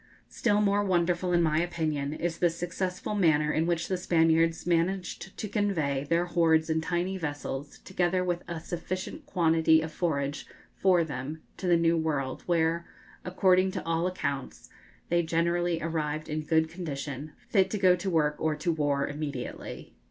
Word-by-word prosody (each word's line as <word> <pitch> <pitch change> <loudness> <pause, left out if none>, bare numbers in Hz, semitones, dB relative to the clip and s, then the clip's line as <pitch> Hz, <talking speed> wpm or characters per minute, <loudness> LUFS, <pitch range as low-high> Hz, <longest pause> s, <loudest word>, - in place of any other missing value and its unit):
Still 210 -3 +1
more 205 0 +2
wonderful, 180 -1 +1
in 175 -1 +3
my 155 -1 +2
opinion, 155 -5 -2
is 165 +2 -3
the 175 - +4
successful 175 +3 -3
manner 155 -6 +3
in 160 +1 +1
which 170 -1 0
the 185 - -1
Spaniards 165 -2 +2
managed 180 +2 -1
to 215 - -3
convey 165 -10 0
their 170 +1 +2
hordes 165 -2 +2
in 160 0 +1
tiny 180 +3 -1
vessels, 145 -2 -5
together 180 0 0
with 175 -1 -1
a 170 -2 -4
sufficient 185 - -5
quantity 160 - +4
of 160 0 -4
forage 145 -4 -2 0.3
for 180 -3 +3
them, 150 +1 -6
to 185 - -4
the 175 -1 +5
New 165 0 +3
World, 145 -5 -1
where, 170 0 +1 0.4
according 185 0 +3
to - - -4
all 165 +1 +1
accounts, 140 -7 -4 0.4
they 175 0 +3
generally 170 +1 0
arrived 155 -2 -2
in 155 0 -2
good 160 +1 +2
condition, 150 -3 -6
fit 195 -3 +3
to 210 - -2
go 185 -2 +5
to 180 +2 -3
work 150 -4 +1
or 155 -1 0
to 155 +3 -1
war 145 -3 +1
immediately. 145 -4 -6
165 Hz, 165 wpm, -28 LUFS, 155-180 Hz, 0.4 s, the